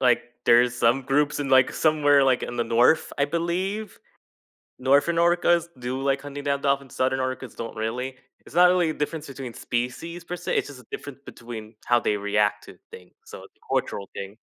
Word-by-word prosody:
like, 125 -2 +3 0.2
there's 120 +1 +5
some 120 +3 +2
groups 145 +2 +1
in, 135 - -3
like, 130 -1 +5
somewhere 145 -3 +4
like, 130 -2 +2
in 120 - -5
the 120 - 0
North, 120 +7 +3
I 140 - +3
believe. 185 +6 -2 0.8
Northern 140 +6 +3
orcas 170 0 +3
do 125 +2 -3
like 140 0 +1
hunting 145 0 -7
down 140 0 0
dolphins, 140 -2 -1
southern 130 +1 +1
orcas 130 -1 -4
don't 115 0 -6
really; 125 +4 -3 0.3
it's - - -14
not 175 +1 +6
really 175 -3 +2
a - - -5
difference 155 +1 -3
between 135 -3 -7
species 145 +9 -4
per 180 +1 -5
se, 180 - -3
it's - - 0
just 140 -3 -11
a - - -23
difference 145 -2 -7
between 115 -2 -9
how 120 0 +4
they 105 - 0
react 105 0 0
to - - -13
things, 90 -1 -13
so, - - -10
it's - - -17
a - - -8
cultural 100 - -1
thing. 100 +3 -7
135 Hz, 200 wpm, -25 LUFS, 120-155 Hz, 0.8 s, not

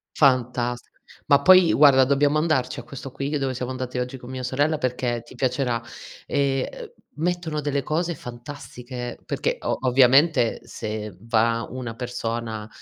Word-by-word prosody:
Fantastico. 125 -3 +1 0.4
Ma 140 -1 +5
poi 185 +1 +7
guarda, 140 -3 +7
dobbiamo 145 +2 +2
andarci 150 -5 0
a - - -8
questo 135 +2 -9
qui 140 +3 -2
dove 135 -2 -1
siamo 125 +1 -4
andati 130 -1 -5
oggi 125 +1 -3
con 125 0 -12
mia 130 -1 -5
sorella 145 +5 +1
perché 125 -2 -1
ti 120 - -15
piacerà. 125 -2 0 0.5
Ehm, 135 -1 0
uhm, - - -9 0.3
mettono 165 -1 -2
delle 140 -1 -1
cose 170 +4 -1
fantastiche 125 -1 -8
perché - - -1
o - - -1
ovviamente 130 +1 +4
se 105 -2 -6
va 115 +1 +1
una 120 -3 -6
persona 115 -3 -4
130 Hz, 150 wpm, -24 LUFS, 120-145 Hz, 0.5 s, poi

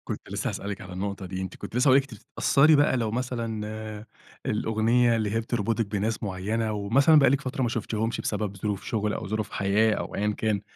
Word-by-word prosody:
كنت - - -6
لسّه - - -2
هاسألِك 100 -1 -5
على 90 0 -9
النقطة 100 +1 -4
دي، 95 +1 -5
أنتِ 95 -1 -5
كنتِ - - -8
لسّه 125 +4 +3
هاقول 130 0 +7
لِك 140 - +3
أنتِ - - -11
بتتأثّري 150 +3 +4
بقى 145 -2 +3
لو 115 -3 -1
مثلًا 110 -3 -4 0.4
الأغنية 115 +3 +2
اللي 110 -2 -1
هي 115 - +1
بتربطِك 115 0 -1
بناس 105 +2 -2
معيّنة 105 +3 -2
ومثلًا 130 +10 +4
بقالِك 140 0 +4
فترة 130 -1 -4
ما 120 - +1
شُفتيهمش 115 0 -2
بسبب 100 -2 -2
ظروف 100 0 -3
شغل 105 -2 -1
أو - - -4
ظروف 110 +1 -3
حياة 105 +3 +2
أو - - -4
أيًا 105 +1 0
كان، 105 -3 0
110 Hz, 200 wpm, -26 LUFS, 105-120 Hz, 0.4 s, هاقول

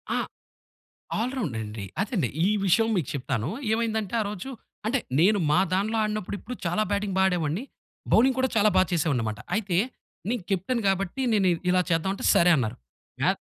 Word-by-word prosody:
ఆ! - - +1 1.0
ఆల్ 245 +3 -1
రౌండండి. 110 - -4 0.2
అదేండి. 200 - 0 0.2
ఈ - - +3 0.2
విషయం 225 +5 +4
మీకు 165 -8 -1
చెప్తాను. 135 -3 -2 0.2
ఏమైందంటే 220 -2 -1
ఆ - - -4
రోజు 210 +6 -6 0.4
అంటే 250 +5 +2 0.2
నేను 205 +5 +4
మా 150 - +4
దానీలో 205 +4 +1
ఆడినప్పుడు 215 -2 -2
ఇప్పుడు 250 +5 -7
చాలా 175 +5 +1
బ్యాటింగ్ 200 -1 -1
బా - - +4
ఆడేవాడిని 175 - -1 0.5
బౌలింగ్ 255 +3 +5
కూడా 260 0 +2
చాలా 215 0 +5
బా 185 - +7
చేసేవాడినన్నమాట. 125 -11 0 0.2
అయితే 200 -5 -1 0.5
నేను 235 -2 -1
కెప్టెన్ 195 +6 0
కాబట్టి 195 +5 -1
నేను 200 -3 +3 0.2
ఇలా 185 0 +4
చేద్దాం 165 +3 +1
అంటే - - -7
సరే 175 +1 +5
అన్నారు. 115 -5 -1 0.4
మ్యా - - +4
195 Hz, 165 wpm, -26 LUFS, 165-220 Hz, 1.0 s, బా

